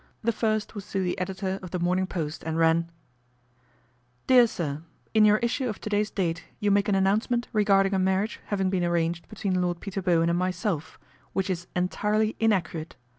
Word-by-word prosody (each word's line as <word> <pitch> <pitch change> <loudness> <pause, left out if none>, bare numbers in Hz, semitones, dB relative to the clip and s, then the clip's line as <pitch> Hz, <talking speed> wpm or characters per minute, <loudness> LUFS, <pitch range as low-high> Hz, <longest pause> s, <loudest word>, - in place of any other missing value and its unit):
The 230 - +2
first 215 -1 -1
was 205 -3 -8
to 195 -1 +1
the 180 - -1
editor 190 +1 -3
of 185 - -8
The 180 - -3
Morning 180 +2 +1
Post, 155 -5 -4
and 160 0 -2
ran: 165 +1 +3 0.7
" 125 0 -38
DEAR 250 -2 +6
SIR, 155 -8 -4 0.2
" - - -38
In 215 -1 +6
your 210 0 +6
issue 250 +2 -1
of 215 - -5
to 215 - -6
day's 210 +1 +1
date 165 -4 -2 0.2
you 205 -2 +1
make 200 +1 +3
an 200 - +3
announcement 215 +5 +1
regarding 200 -2 +3
a 190 - +2
marriage 190 +3 0
having 195 -2 0
been 185 -2 0
arranged 170 0 -1
between 195 -4 -1
Lord 175 -1 -1
Peter 195 0 -4
Bowen 170 -2 +2
and 170 - +1
myself, 180 -3 -2 0.4
which 190 0 0
is 175 -1 -4
entirely 210 +4 0
inaccurate. 185 -7 0
190 Hz, 195 wpm, -26 LUFS, 170-210 Hz, 0.7 s, DEAR